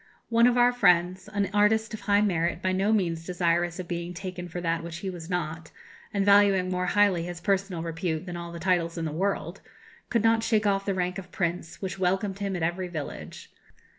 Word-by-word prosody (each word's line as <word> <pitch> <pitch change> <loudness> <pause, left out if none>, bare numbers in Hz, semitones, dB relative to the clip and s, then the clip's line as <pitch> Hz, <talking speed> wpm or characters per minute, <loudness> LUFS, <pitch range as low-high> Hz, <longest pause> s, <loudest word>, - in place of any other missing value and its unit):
One 235 +1 +5
of 245 0 +2
our 245 0 +5
friends, 185 -4 +3
an 200 -1 -1
artist 220 +2 +3
of 220 - -5
high 200 0 +3
merit, 170 -4 0
by 185 +1 0
no 195 +3 +1
means 170 -6 0
desirous 175 -1 0
of 185 -2 -6
being 175 0 -4
taken 180 -1 -6
for 175 +1 -6
that 165 -1 -1
which 170 0 -6
he 190 +1 -4
was 170 -2 -9
not, 165 -3 -3 0.4
and 200 -1 0
valuing 200 -2 +5
more 180 0 -1
highly 200 -3 +3
his 175 -1 -6
personal 190 -2 -1
repute 165 0 -3
than 175 -2 -6
all 170 0 -6
the 170 - -7
titles 175 -1 0
in 165 - -2
the 155 - -2
world, 195 +6 -2 0.5
could 230 -2 +1
not 225 0 +4
shake 220 -2 +1
off 195 -1 +1
the 195 - 0
rank 180 0 -1
of 185 -1 -11
prince, 170 0 -3
which 190 0 -4
welcomed 190 +2 0
him 200 -1 -2
at 175 - -2
every 175 +2 -1
village. 155 -5 -7
185 Hz, 215 wpm, -27 LUFS, 170-200 Hz, 0.5 s, One